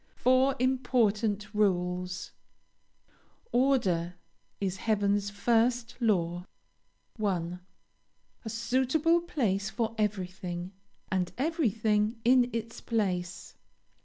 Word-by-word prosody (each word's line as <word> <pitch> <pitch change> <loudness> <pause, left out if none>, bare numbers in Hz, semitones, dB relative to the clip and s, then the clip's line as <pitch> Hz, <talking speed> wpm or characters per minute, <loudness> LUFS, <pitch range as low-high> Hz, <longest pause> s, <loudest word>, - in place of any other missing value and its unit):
FOUR 255 +2 +3
IMPORTANT 225 -5 +1
RULES. 180 -3 0 1.2
"Order 200 -10 +2 0.4
is 190 -2 -2
heaven's 205 -2 +1
first 230 +3 +1
law." 175 -7 +1 0.7
1. 180 -5 -1 0.8
A 225 - -5
suitable 265 +9 +2
place 210 - -1
for 225 -2 -2
everything, 185 -3 -3 0.4
and 185 -2 0
everything 225 - +1
in 250 0 +5
its 230 0 -5
place. 190 -5 -2
215 Hz, 80 wpm, -29 LUFS, 185-245 Hz, 1.2 s, in